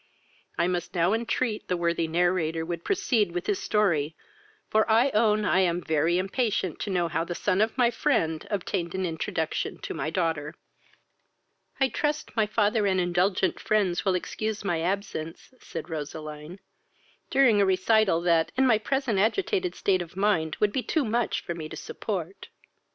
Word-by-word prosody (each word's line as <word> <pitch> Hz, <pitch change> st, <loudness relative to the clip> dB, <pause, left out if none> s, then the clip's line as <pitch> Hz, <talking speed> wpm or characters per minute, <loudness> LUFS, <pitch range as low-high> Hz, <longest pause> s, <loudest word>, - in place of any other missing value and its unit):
I 170 Hz, -, +2 dB
must 180 Hz, 0 st, -3 dB
now 175 Hz, +3 st, +3 dB
entreat, 230 Hz, 0 st, -1 dB
the 180 Hz, -, 0 dB
worthy 170 Hz, -1 st, 0 dB
narrator 165 Hz, -1 st, +1 dB
would 170 Hz, 0 st, -4 dB
proceed 225 Hz, -, +1 dB
with 175 Hz, 0 st, -3 dB
his 205 Hz, -, 0 dB
story, 165 Hz, -8 st, +1 dB, 0.5 s
for 220 Hz, +1 st, +2 dB
I 235 Hz, +5 st, +4 dB
own 215 Hz, -1 st, +2 dB
I 190 Hz, -, +3 dB
am 175 Hz, -2 st, +2 dB
very 160 Hz, +1 st, +1 dB
impatient 195 Hz, -, -1 dB
to -, -, -4 dB
know 175 Hz, -3 st, +1 dB
how 165 Hz, 0 st, -1 dB
the 175 Hz, +1 st, -5 dB
son 195 Hz, +1 st, +1 dB
of 220 Hz, +3 st, 0 dB
my 240 Hz, -2 st, +4 dB
friend 165 Hz, -, 0 dB
obtained 185 Hz, -3 st, -2 dB
an 190 Hz, 0 st, -1 dB
introduction 160 Hz, -1 st, -2 dB
to -, -, -4 dB
my -, -, -3 dB
daughter." 160 Hz, -3 st, -1 dB, 1.2 s
"I 270 Hz, -1 st, +3 dB
trust, 300 Hz, +2 st, -2 dB
my 220 Hz, -2 st, +2 dB
father 210 Hz, 0 st, +2 dB
and 190 Hz, -1 st, +2 dB
indulgent 180 Hz, +2 st, +1 dB
friends 195 Hz, -5 st, +1 dB
will 190 Hz, -2 st, +2 dB
excuse 215 Hz, +4 st, -3 dB
my 170 Hz, -4 st, 0 dB
absence, 180 Hz, +1 st, -4 dB
(said 165 Hz, -1 st, -7 dB
Roseline,) 155 Hz, +2 st, -7 dB, 0.7 s
during 235 Hz, -7 st, +4 dB
a -, -, +4 dB
recital, 190 Hz, -1 st, +3 dB
that, 170 Hz, -2 st, +2 dB
in 265 Hz, -, +4 dB
my 225 Hz, -4 st, +4 dB
present 265 Hz, -3 st, 0 dB
agitated 365 Hz, -, 0 dB
state 185 Hz, -2 st, +1 dB
of 175 Hz, +1 st, -9 dB
mind, 195 Hz, -6 st, +1 dB
would 210 Hz, -1 st, +3 dB
be 260 Hz, -, 0 dB
too 300 Hz, +2 st, 0 dB
much 235 Hz, +1 st, 0 dB
for 170 Hz, -, -4 dB
me 160 Hz, -2 st, -7 dB
to -, -, -8 dB
support." 190 Hz, -3 st, -5 dB
185 Hz, 170 wpm, -27 LUFS, 170-215 Hz, 1.2 s, I